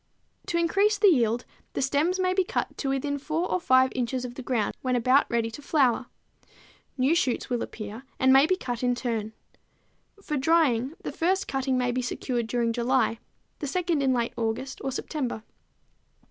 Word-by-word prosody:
To 340 - 0
increase 395 +5 +2
the 405 0 +6
yield 240 -6 +2 0.3
the - - -2
stems 300 +8 +1
may 370 0 +2
be 380 0 +2
cut - - -3
to 275 - -1
within 285 +1 -1
4 320 +5 -2
or 365 - +1
5 260 -3 +4
inches 250 0 -2
of 245 - -6
the 260 - -7
ground 240 -5 -1
when 255 -1 0
about 255 +4 +3
ready 230 -1 0
to 290 - -9
flower. 265 -5 +2 0.9
New 265 +4 +3
shoots 275 -6 0
will 240 -1 0
appear 215 +1 -6 0.2
and 260 0 +5
may 270 +3 +6
be 370 - +3
cut 245 -10 -4
in 245 -1 +1
turn. 225 -3 -3 0.9
For 300 -5 -2
drying, 275 -3 +2
the - - -4
first 375 +4 0
cutting 265 -1 0
may 250 -1 +1
be 255 +1 -1
secured 245 -1 -2
during 235 0 0
July, 240 -1 +1 0.4
the 290 - -3
second 340 0 0
in 270 -1 +2
late 240 -2 0
August 235 +4 -3
or 270 - -1
September. 255 -4 -4
260 Hz, 185 wpm, -26 LUFS, 240-305 Hz, 0.9 s, the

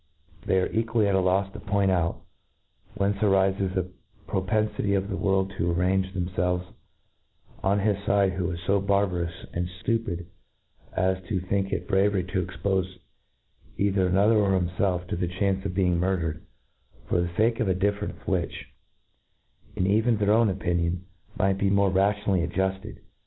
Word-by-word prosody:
They 95 - +3
are 90 - +1
equally 115 -1 +1
a£ 100 - +2
a 95 - +4
lofs 95 +2 +1
to - - -8
point 100 -1 +1
out, 85 -2 0 0.7
whence 100 +1 0
arlfes 95 -1 +2
the 90 -1 -2 0.4
propenfity 105 +1 0
of 95 +1 -3
the - - -1
world 95 +2 0
to 85 +1 +1
arrange 95 +2 +1
themfelves 90 0 -1 1.0
on 100 +1 +2
his 100 -1 0
fide, 100 -2 +2
who 90 -1 -2
is 85 -2 -4
fo 100 +2 +3
barbarous 95 -4 0
and 85 0 -1 0.2
ftupid 115 -8 -1 0.7
as 95 +1 +1
to 100 -4 0
/ - - -7
think 95 0 0
it - - -2
bravery 95 -1 +2
to 90 +1 -2
expofe 95 0 -2 0.8
either 95 -2 +2
anojher 100 +5 +4
or 100 -1 +2
him 90 -2 0
felf 90 -1 -1
to - - -1
the 90 +1 -1
chance 95 +1 -1
of 90 - -6
being 90 -3 +2
murdered, 85 -3 -1 0.6
for 90 - +1
the 85 - -1
fake 115 +1 +2
of 115 - +1
a 95 - +2
difference 100 +2 -2
which, 90 -4 -3 1.0
in 95 - 0
even 110 +4 +3
their 105 0 +2
own 110 0 +4
opinion, 90 -1 -1 0.3
might 95 -1 +1
be 100 - +2
more 100 -1 +3
rationally 100 0 +2
adjufted. 95 +2 -2
95 Hz, 165 wpm, -26 LUFS, 90-100 Hz, 1.0 s, a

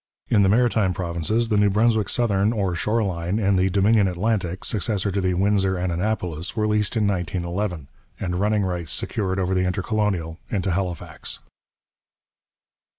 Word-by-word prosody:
In 105 - +4
the 95 - +4
Maritime 110 -4 +2
Provinces 95 +6 -1
the 105 - +2
New 105 0 +4
Brunswick 110 +1 +2
Southern 105 -2 +1
or 100 -5 0
Shore 105 +7 0
line 90 0 -2
and 100 -2 +2
the 95 +1 +2
Dominion 100 +2 +3
Atlantic, 95 -1 -1
successor 100 -1 -1
to 100 +1 -1
the 90 -1 +1
Windsor 95 0 +2
and 90 0 -1
Annapolis, 90 -2 -2
were 110 -2 +1
leased 105 +2 +1
in 105 - +2
1911, 90 -2 -2 0.3
and 90 -1 -2
running 105 +1 +2
rights 90 -4 -3
secured 95 -3 -2
over 95 0 0
the 90 0 +1
Intercolonial 90 -3 -1
into 95 -2 -1
Halifax. 90 -1 -4
95 Hz, 155 wpm, -23 LUFS, 90-105 Hz, 0.3 s, In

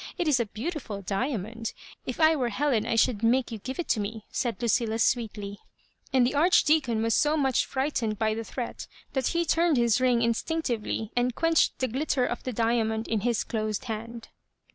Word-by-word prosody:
It 350 - -1
is 285 -4 +3
a 235 - 0
beautiful 225 - -5
diamond; 225 +2 -3 0.3
if 255 - -4
I 320 0 +5
were 250 -5 0
Helen 235 -2 0
I 230 - 0
should 225 -1 +2
make 240 +3 +2
you 225 - -5
give 260 +5 -6
it 350 - 0
me," 215 +1 -4
said 240 -3 -2
Lucilla. 230 -1 +1
sweetly; 215 -3 -1 0.5
and 260 -2 +4
the 250 - 0
Arch 330 +6 +4
deacon 265 -8 +2
was 230 0 +1
so 300 +1 +3
much 265 -4 +2
frightened 260 -6 -1
by 220 0 +1
Jkhe 225 0 -5
threat 245 -3 -5 0.3
that 265 -2 0
he 340 0 0
turned 330 -2 +2
his 235 0 +3
ring 245 -2 +3
instinctively, 235 -3 -1
and 245 0 +1
quench 330 -1 +3
ed - - -21
the 260 - 0
glitter 260 +1 0
of 240 - -3
the 255 - -4
diamond 225 -1 0
in 225 - 0
his 235 +1 0
closed 215 -1 -3
hand. 230 0 -6
235 Hz, 195 wpm, -27 LUFS, 220-265 Hz, 0.5 s, I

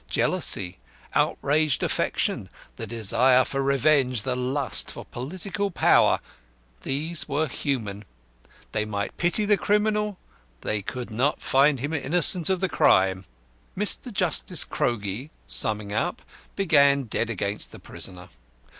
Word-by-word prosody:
Jealousy, 90 -1 -1 0.3
outraged 150 -1 +1
affection, - - -1 0.3
the 115 - -6
desire 120 +4 +3
for 135 - -3
revenge, 135 -3 +2
the 130 -1 -1
lust 130 +2 0
for - - -7
political 185 +9 -4
power 175 - +3 0.6
these 155 +4 -1
were 150 +3 0
human. 115 -7 -3 0.7
They 105 - -1
might 100 -1 -4
pity 175 +5 +1
the 205 0 +3
criminal, 210 -1 0 0.4
they 105 -1 -2
could 120 +3 -6
not 130 +7 0
find 135 +1 +3
him 145 +5 -3
innocent 165 +3 +2
of 190 -1 0
the 190 - +1
crime. 95 - +2 0.5
Mr. 210 +5 +1
Justice 180 -2 +2
CROGIE, 115 +3 -2 0.2
summing 100 - 0
up, - - -2 0.3
began 140 -7 +4
dead 115 0 -2
against 100 -1 -2
the - - -11
prisoner. 90 -1 -6
135 Hz, 125 wpm, -25 LUFS, 110-165 Hz, 0.7 s, began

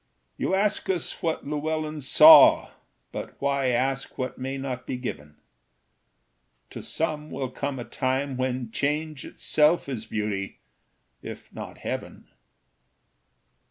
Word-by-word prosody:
You - - 0
ask 205 +1 0
us 180 -4 -2
what 165 -1 -2
Llewellyn 155 +1 -3
saw, 310 - +8 0.4
But - - -7
why 140 -1 0
ask 130 +2 -1
what 130 0 -3
may 135 +1 -4
not 130 -2 -5
be 125 - -3
given? 75 - -7 1.4
To - - -7
some 155 -1 -3
will 130 -1 -4
come 140 +1 -4
a 120 - -6
time 130 +3 -2
when 125 -2 -2
change 150 +2 -2
Itself 155 +2 +2
is 115 -5 -5
beauty, 105 -3 -3 0.6
if - - -10
not - - -8
heaven. - - -6
135 Hz, 125 wpm, -26 LUFS, 125-155 Hz, 1.4 s, saw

